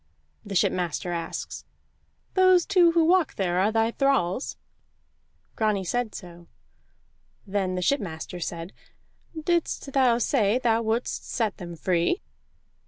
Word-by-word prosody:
The 200 -1 -6
shipmaster 175 -1 0
asks: 170 -1 -5 0.7
"Those 370 -2 +5
two 355 -4 +4
who 330 -1 +4
walk 355 0 +3
there 180 -2 0
are 200 +3 +3
thy 225 +1 +2
thralls?" 190 - 0 1.0
Grani 210 -3 +1
said 235 +4 -2
so. 175 -2 -10 1.0
Then 190 -2 -1
the 180 - -2
shipmaster 180 - -2
said: 170 +1 -5 0.7
"Didst 320 -4 -1
thou 255 -4 +4
say 230 -3 +2
thou 230 -3 +2
wouldst 225 +2 -2
set 220 -5 -1
them 175 -2 -7
free?" 170 - 0
215 Hz, 120 wpm, -26 LUFS, 180-275 Hz, 1.0 s, Those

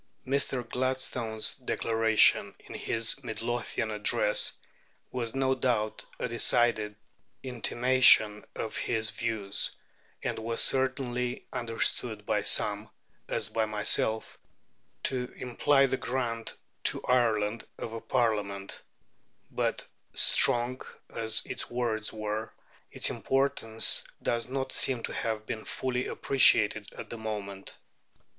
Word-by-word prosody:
Mr. 130 -2 0
Gladstone's 125 -3 -1
declaration 115 -3 +3
in - - -12
his 115 +4 -2
Midlothian 115 -1 -3
address - - +2 0.6
was 120 -2 -4
no 135 0 +2
doubt 120 -4 -1
a - - -2
decided 115 -2 +2 0.5
intimation 125 -3 +4
of 110 - -5
his 110 -2 -1
views, 100 -2 -2 0.5
and - - -2
was 115 +1 -2
certainly 125 -2 +1
understood 120 -2 -2
by - - 0
some - - +1 0.4
(as - - -1
by 110 -1 0
myself) 110 +1 +1 0.6
to 125 -2 -2
imply 135 +3 +2
the 130 0 -1
grant 120 -3 -3 0.3
to - - +1
Ireland 115 -3 +1
of 115 - -6
a 115 - -6
Parliament; 105 -5 -1 0.7
but, - - -1 0.3
strong 125 0 +5 0.3
as 110 -1 +1
its - - -5
words 115 -3 -2
were, 110 0 -4 0.4
its - - 0
importance 135 -5 +2 0.2
does 115 0 -1
not 135 0 -3
seem 125 -3 +1
to - - -4
have 110 -1 -3
been 110 - -5
fully 125 -1 -3
appreciated 105 -6 +3
at - - -9
the 115 - -6
moment. 100 -3 -6
115 Hz, 110 wpm, -29 LUFS, 110-130 Hz, 0.7 s, strong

